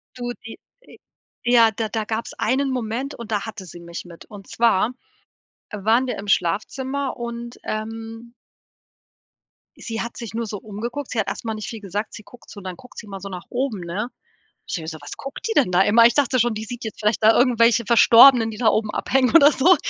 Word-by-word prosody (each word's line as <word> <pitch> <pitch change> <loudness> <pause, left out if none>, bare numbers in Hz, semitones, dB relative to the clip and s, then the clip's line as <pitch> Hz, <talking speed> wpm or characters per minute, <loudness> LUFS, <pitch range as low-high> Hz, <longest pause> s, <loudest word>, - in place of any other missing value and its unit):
Du 245 -1 -4
die 225 - -9 0.2
äh, - - -17 0.5
ja, 235 -2 +5
da 220 +1 -3
da 220 0 -2
gab's 220 +2 -4
einen 270 +4 0
Moment 250 +3 -3
und 230 -2 -9
da 205 -2 -1
hatte 220 -4 -8
sie 175 0 -11
mich 170 +1 -8
mit 170 -1 -13
und 205 -3 -13
zwar 230 0 +2 0.8
waren 220 +5 +1
wir 250 - -3
im 200 - -8
Schlafzimmer 260 +10 -1
und, 235 0 -6
ähm 225 +2 -6 1.5
sie 225 -1 -5
hat 235 - -6
sich 230 -4 -7
nur 230 +1 -2
so 210 - -5
umgeguckt. 235 +7 -6
Sie 235 - -2
hat - - 0
erst - - -5
mal 225 - -2
nicht 215 -1 -6
viel 225 - -7
gesagt, 205 +2 -4
sie 215 - -10
guckt 245 +2 -17
so 200 - -10
dann 185 -1 -6
guckt 250 +3 -17
sie 220 - -8
mal 195 -1 -7
so 195 +1 -8
nach 180 -2 -8
oben, 245 -6 -2
ne? 190 +8 -4 0.6
Ich - - -5
denke 165 - -4
mir - - -8
so: 160 -1 -6
„Was 145 - -8
guckt 275 -1 -8
die - - 0
denn 275 - +3
da 180 +1 +4
immer?“ 225 +4 +6
Ich 240 - +3
dachte 270 -3 +2
schon, 240 0 +1
die 215 0 -5
sieht 240 +2 -8
jetzt 220 - -6
vielleicht 210 +1 0
da 220 +1 +6
irgendwelche 235 -2 +4
Verstorbenen, 235 0 +7
die 215 - -9
da 225 -2 +3
oben 215 -1 +1
abhängen 260 -1 +1
oder 300 -2 +8
so, 345 +8 +5
225 Hz, 220 wpm, -22 LUFS, 210-245 Hz, 1.5 s, oder